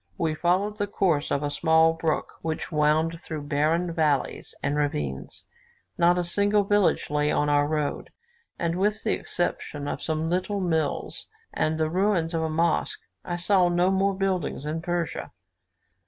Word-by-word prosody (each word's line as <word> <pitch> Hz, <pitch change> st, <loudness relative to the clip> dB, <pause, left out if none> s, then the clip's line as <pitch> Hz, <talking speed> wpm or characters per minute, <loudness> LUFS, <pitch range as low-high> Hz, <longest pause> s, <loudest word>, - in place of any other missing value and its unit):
We 160 Hz, -1 st, 0 dB
followed 185 Hz, +6 st, 0 dB
the 205 Hz, -, 0 dB
course 175 Hz, -7 st, +1 dB
of 140 Hz, -, 0 dB
a 145 Hz, -, -1 dB
small 160 Hz, +1 st, +4 dB
brook, 165 Hz, -1 st, -2 dB
which 160 Hz, -1 st, -3 dB
wound 155 Hz, +2 st, +2 dB
through 155 Hz, -3 st, -6 dB
barren 155 Hz, +4 st, 0 dB
valleys 150 Hz, -5 st, 0 dB
and 140 Hz, -, 0 dB
ravines; 75 Hz, -, -3 dB, 0.5 s
not 175 Hz, +1 st, +4 dB
a 180 Hz, -, +1 dB
single 205 Hz, +4 st, +2 dB
village 205 Hz, -6 st, +2 dB
lay 150 Hz, 0 st, +1 dB
on 150 Hz, -, +1 dB
our 145 Hz, 0 st, +3 dB
road; 150 Hz, -1 st, -2 dB, 0.5 s
and 170 Hz, 0 st, -1 dB
with 210 Hz, +2 st, 0 dB
the 220 Hz, -, +1 dB
exception 145 Hz, -4 st, -3 dB
of -, -, -3 dB
some 160 Hz, 0 st, -1 dB
little 185 Hz, +4 st, -1 dB
mills 160 Hz, -5 st, -1 dB, 0.3 s
and 155 Hz, 0 st, 0 dB
the 160 Hz, 0 st, +1 dB
ruins 180 Hz, -3 st, +1 dB
of 165 Hz, -, 0 dB
a 160 Hz, -, -1 dB
mosque, 155 Hz, -, 0 dB, 0.2 s
I 175 Hz, -, -3 dB
saw 180 Hz, 0 st, +3 dB
no 175 Hz, +2 st, +2 dB
more 195 Hz, +1 st, +2 dB
buildings 185 Hz, -7 st, -1 dB
in 155 Hz, +2 st, -3 dB
Persia. 175 Hz, -1 st, -3 dB
165 Hz, 165 wpm, -26 LUFS, 150-180 Hz, 0.5 s, small